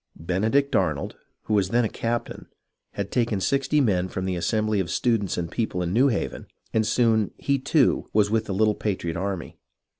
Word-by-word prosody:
Benedict 110 - +1
Arnold, 90 -5 0 0.3
who 110 - -3
was 100 -3 +2
then 120 +2 +2
a - - +2
captain, 115 +2 -4 0.5
had 100 -1 -4
taken 115 -5 +1
sixty 140 +7 +1
men 95 -9 +2
from 95 0 -4
the 95 -1 -1
assem 110 +5 0
bly 110 -1 0
of 95 -3 -1
students 115 -6 0
and 85 -2 -3
people 110 -6 -2
in 85 +1 -2
New 125 +6 +4
Haven, 115 -7 -2 0.3
and 110 -1 +2
soon 110 -2 +2
he, 140 -1 0
too, 140 0 +2
was 105 -1 +2
with 110 0 +1
the 100 - -3
little 110 +1 +3
patriot 95 -6 -3
army. 95 -1 -4
105 Hz, 190 wpm, -25 LUFS, 95-120 Hz, 0.5 s, New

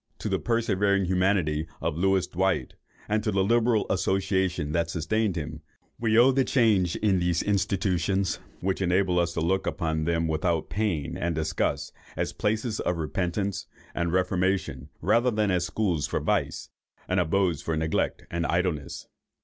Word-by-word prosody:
To - - -4
the - - 0
persevering 100 -4 +1
humanity 90 -4 +1
of 80 -1 -2
Louis 95 +2 +2
Dwight, 95 +2 -1 0.3
and 105 0 0
to - - 0
the 95 0 +2
liberal 115 +1 +2
association 95 -4 0
that 85 +1 0
sustained 95 +5 0
him, 75 -1 -5 0.4
we 115 -1 +2
owe 125 +3 +7
the 135 0 +2
change 105 -10 +2
in 100 -3 +2
these 90 -1 +1
institutions 95 -1 0 0.2
which 95 +1 -1
enables 90 0 +2
us 85 0 0
to 80 - -1
look 95 +4 0
on 80 -3 -1
them 85 0 +1
without 80 +1 -1
pain 95 -9 -1
and 85 -1 -2
disgust 80 +1 -1 0.2
as - - -1
places 110 +1 -1
of 90 - -1
repentance 90 +4 -2 0.3
and 85 -1 -1
reformation, 90 -6 0
rather 120 +2 +3
than 105 -3 +1
as 90 -1 +1
schools 90 -9 0
for - - -1
vice, - - -1 0.4
and 90 +1 +1
abodes 85 -1 +1
of 80 -1 0
neglect 80 0 -1
and 85 -1 -1
idleness. 85 -5 -2
95 Hz, 155 wpm, -27 LUFS, 85-100 Hz, 0.4 s, owe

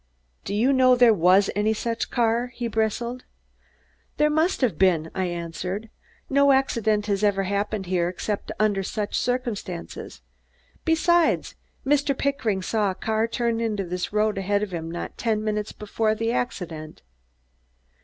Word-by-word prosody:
"Do 200 - -3
you 245 +6 +3
know 255 -1 +5
there 245 -2 +6
was 185 +2 +4
any 215 +2 +1
such 230 +2 -2
car?" 235 0 +1
he 240 - -3
bristled. 230 +3 -1 0.9
"There 300 0 +3
must 315 +4 +1
have 225 -11 +1
been," 165 -4 +3
I 190 - -1
answered. 180 +5 -4 0.4
"No 280 0 +4
accident 220 -6 +1
has 200 -1 -1
ever 200 -2 +2
happened 200 +1 -2
here 175 -1 0
except 200 +3 -4
under 210 -2 +2
such 205 +2 -3
circumstances. 220 - -3 0.6
Besides, 330 +1 +2 0.3
Mr. 280 -1 +2
Pickering 230 -9 -1
saw 210 0 +1
a 185 - -3
car 220 +2 0
turn 230 0 -1
into 215 -3 -1
this 180 0 -4
road 210 -1 +1
ahead 200 +2 0
of 200 -3 -5
him 165 -1 -4
not 170 +1 -6
ten 220 -2 0
minutes 210 0 -2
before 215 +1 -1
the 225 +1 -1
accident." 165 - -4
215 Hz, 150 wpm, -24 LUFS, 195-240 Hz, 0.9 s, there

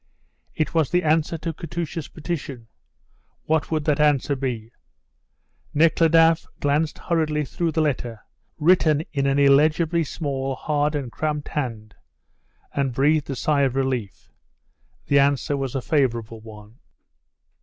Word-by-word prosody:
It 155 - -1
was 160 -5 +2
the 180 0 +1
answer 160 +1 +1
to 165 +1 -4
Katusha's 165 -1 -5
petition. 145 -7 -6 0.8
What 160 -1 0
would 155 -2 -1
that 150 -2 +1
answer 145 -2 +2
be? 120 -4 -4 1.0
Nekhludoff 165 +1 +4
glanced 145 +2 0
hurriedly 155 -3 -1
through 165 +4 -2
the 160 - +2
letter, 120 -6 -3 0.4
written 155 -2 +3
in 140 -2 0
an 135 0 +1
illegibly 155 +4 +3
small, 135 -3 -3
hard, 150 +2 -1
and 135 -5 -3
cramped 150 +6 -3
hand, 115 -7 -4 0.8
and 135 -3 -1
breathed 145 +2 +2
a 135 - -2
sigh 145 +1 +1
of 135 -2 +1
relief. 130 -7 -3 0.7
The 140 - +3
answer 140 +1 +2
was 135 -2 -3
a 130 - -2
favourable 115 -6 0
one. 110 +2 -13
145 Hz, 135 wpm, -23 LUFS, 135-160 Hz, 1.0 s, Nekhludoff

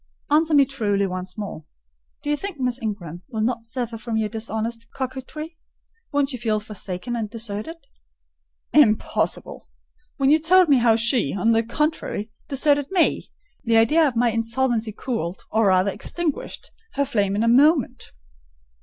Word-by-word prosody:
Answer 315 +1 +4
me 280 -1 +6
truly 210 -7 0
once 185 0 -5
more. 200 -6 -6 0.6
Do 295 - -1
you - - +3
think 370 0 -6
Miss 255 0 -1
Ingram 180 -7 -5
will 220 -4 -3
not 235 +1 -1
suffer 230 -1 -4
from 220 +1 -3
your 215 -1 0
dishonest 225 +1 -4
coquetry? 270 +5 -6 0.5
Won't 285 -1 +1
she 250 - -4
feel 220 -2 0
forsaken 210 +1 -5
and 220 -3 -3
deserted?" 225 +7 -5 1.0
"Impossible!—when 275 +2 0
I - - +6
told 355 +2 +4
you 265 - +5
how 230 -2 +4
she, 230 - +1
on 200 +4 +2
the 225 0 +4
contrary, 230 -3 -2 0.2
deserted 285 0 +2
me: 370 -3 +1 0.3
the 230 -1 +3
idea 300 +8 +5
of 260 - -3
my 235 0 +3
insolvency 230 0 0
cooled, 210 -6 -4
or 220 -1 +3
rather 185 +1 +3
extinguished, 330 - -4 0.2
her 280 0 +1
flame 200 -5 0
in 210 - +1
a - - +2
moment." 265 0 +3
230 Hz, 155 wpm, -23 LUFS, 215-280 Hz, 1.0 s, me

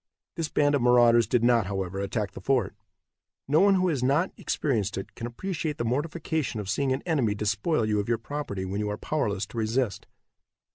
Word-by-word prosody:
This 165 -2 -2
band 145 0 +2
of 140 - +2
marauders 120 -1 +5
did 120 -2 +1
not, 120 -5 +3
however, 95 -1 -3
attack 100 0 -2
the - - -10
fort. 130 -8 +1 0.7
No 150 +3 +4
one 200 0 +5
who 185 0 +2
has 145 -6 -1
not 140 +8 +2
experienced 110 -10 -1
it 95 - -6
can 115 - -5
appreciate 160 +4 -4
the 120 - -2
mortification 145 -1 -2
of 100 -2 -3
seeing 135 +6 0
an 130 - -1
enemy 135 -12 +1
despoil 105 +6 0
you 105 -1 +1
of 105 - -3
your 120 - +2
property 115 -6 -5
when 95 +2 -3
you 105 0 -1
are 105 - -3
powerless 105 -10 -1
to 110 +2 -6
resist. 110 0 -1
120 Hz, 200 wpm, -27 LUFS, 105-145 Hz, 0.7 s, marauders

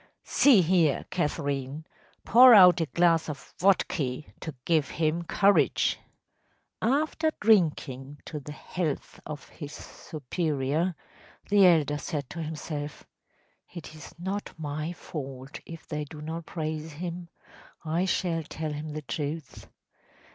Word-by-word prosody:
See 245 -10 +5
here, 165 -4 +2
Catherine, 145 -3 -2 0.4
pour 250 0 +9
out 180 -3 +8
a 165 - 0
glass 165 0 +2
of 145 -1 -8
vodka 165 -8 +1 0.2
to 160 - -6
give 155 -5 +2
him 165 +1 0
courage!‚ÄĚ 185 - +3 1.0
After 315 0 -1
drinking 150 - +2
to 150 - -5
the 145 +1 -9
health 155 0 -4
of 150 -3 -7
his 145 -1 -9
superior, 155 +3 -2 0.5
the 200 -2 +6
elder 150 -4 +3
said 145 -5 -4
to 165 - -5
himself: 150 -1 -5 0.7
“It 170 -3 -9
is 155 0 -12
not 190 +4 -4
my 155 +1 -4
fault 135 -5 -7
if 165 -1 -10
they 150 -1 -3
do 150 +1 -11
not 160 +2 -6
praise 155 -1 -4
him. 170 +2 -6 0.6
I 165 +4 0
shall 175 -3 0
tell 155 0 -5
him 150 +1 -5
the 155 0 -5
truth. 150 +2 -5
160 Hz, 125 wpm, -28 LUFS, 150-175 Hz, 1.0 s, pour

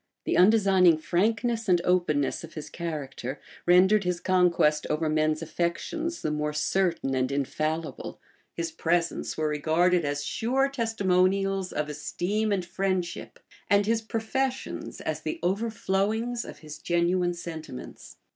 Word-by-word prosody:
The - - 0
undesigning 190 -4 +5
frankness 220 +6 0
and 175 -1 +5
openness 170 -7 +1
of 165 - -11
his 155 - -7
character 145 -5 -5 0.3
rendered 190 +4 +5
his 180 -1 -1
conquest 170 -5 +2
over 155 +1 0
men's 155 +1 +1
affections 310 - -3
the 155 - 0
more 150 0 -1
certain 165 -2 0
and 130 0 0
infallible: 155 +3 -3 0.4
his 165 -1 -3
presents 170 +1 -1
were 155 -1 0
regarded 165 +4 +2
as 145 0 -2
sure 260 - 0
testimonials 195 -5 +1
of 150 - -2
esteem 185 +8 -2
and 190 -3 0
friendship; 185 -1 -2 0.3
and 200 0 +4
his 225 +1 +1
professions 250 +4 -3
as - - -3
the 340 - -3
over 200 +6 0
flowings 220 +4 -1
of - - -9
his 155 0 -8
genuine 175 +1 +1
sentiments. 160 -6 -8
180 Hz, 135 wpm, -27 LUFS, 155-205 Hz, 0.4 s, undesigning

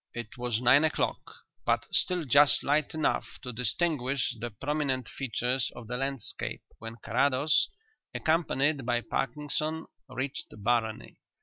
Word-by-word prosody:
It 120 -2 -6
was 120 -2 -1
nine 130 +4 +6
o'clock, 155 - +1 0.4
but - - +1
still 180 -2 +2
just 140 +2 +6
light 150 +1 +1
enough 155 - 0
to 125 -2 -5
distinguish 130 +1 0
the 120 +2 -3
prominent 135 +1 -1
features 125 -1 -1
of 120 - -9
the 120 +3 -4
landscape, 135 -2 -3 0.2
when 115 0 -6
Carrados, 140 +4 +3 0.4
accompanied 155 -3 +1
by 120 0 +1
Parkinson, 150 +7 -2 0.2
reached 130 +1 -4 0.2
Barony. 115 -1 0
130 Hz, 125 wpm, -29 LUFS, 120-145 Hz, 0.4 s, nine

